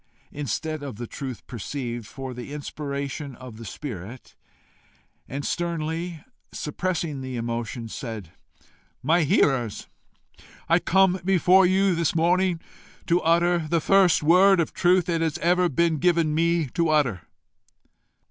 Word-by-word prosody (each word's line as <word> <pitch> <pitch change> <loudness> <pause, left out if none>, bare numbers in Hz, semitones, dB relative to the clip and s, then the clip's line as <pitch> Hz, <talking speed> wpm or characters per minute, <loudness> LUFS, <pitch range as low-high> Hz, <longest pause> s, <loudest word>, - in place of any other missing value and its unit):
instead 150 +3 -3
of 140 -5 -6
the 120 +3 -6
truth 130 -2 -7
perceived, 120 -1 -5
for 135 -1 -7
the 125 +3 -8
inspiration 140 -1 -5
of 125 -4 -11
the 115 - -9
spirit; 115 - -8 1.0
and, 140 +2 -4
sternly 170 -1 -3 0.3
suppressing 160 -2 -3
the 130 -1 -5
emotion, 115 0 -4
said, 110 -7 -7 0.7
"My 165 +6 +3
hearers, 130 -6 +1 0.8
I 170 +1 +4
come 190 +1 +3
before 185 0 +5
you 190 +1 +3
this 165 -2 0
morning 175 +1 +2 0.5
to 170 +1 +2
utter 170 0 +2
the 170 +2 +1
first 185 -1 +4
word 185 +4 +6
of 170 - 0
truth 180 -1 +3
it 165 -2 0
has 160 -1 0
ever 180 +1 +2
been 165 +1 +1
given 170 -2 +2
to - - -1
ME 170 +1 +2
to 170 -2 +1
utter." 135 - +2
155 Hz, 135 wpm, -25 LUFS, 130-175 Hz, 1.0 s, word